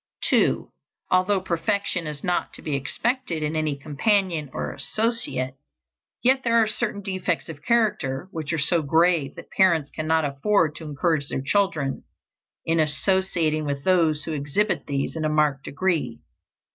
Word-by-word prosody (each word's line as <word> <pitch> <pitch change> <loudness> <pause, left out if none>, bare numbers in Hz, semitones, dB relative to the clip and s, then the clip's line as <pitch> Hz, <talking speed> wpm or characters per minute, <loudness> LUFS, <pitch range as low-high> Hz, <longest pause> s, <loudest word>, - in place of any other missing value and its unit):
2. - - +2 0.4
Although 185 +2 +3
perfection 180 0 -1
is 150 -1 -6
not 180 0 -1
to - - -6
be 150 -3 -1
expected 175 - -1
in 150 +1 -2
any 155 -2 0
companion 160 +1 0
or - - -4
associate, 215 - -1 0.7
yet 260 +2 +4
there 230 -1 +3
are 225 - +5
certain 215 -1 -2
defects 185 -3 -2
of 150 -3 -8
character 190 - +1
which 160 -3 -4
are 160 - 0
so 160 +3 +2
grave 160 -1 +2
that - - -11
parents 170 -6 +3
cannot 160 0 +1
afford 150 +4 +1
to 160 +1 -9
encourage 150 0 0
their - - -1
children 155 -5 0 0.6
in 165 0 +1
associating 160 0 +1
with 140 -1 -3
those 165 -5 +3
who 160 - -4
exhibit 150 +9 -1
these 140 +1 -2
in 160 - -3
a 155 - +1
marked 150 -3 +1
degree. 145 -7 -1
160 Hz, 155 wpm, -24 LUFS, 145-190 Hz, 0.7 s, are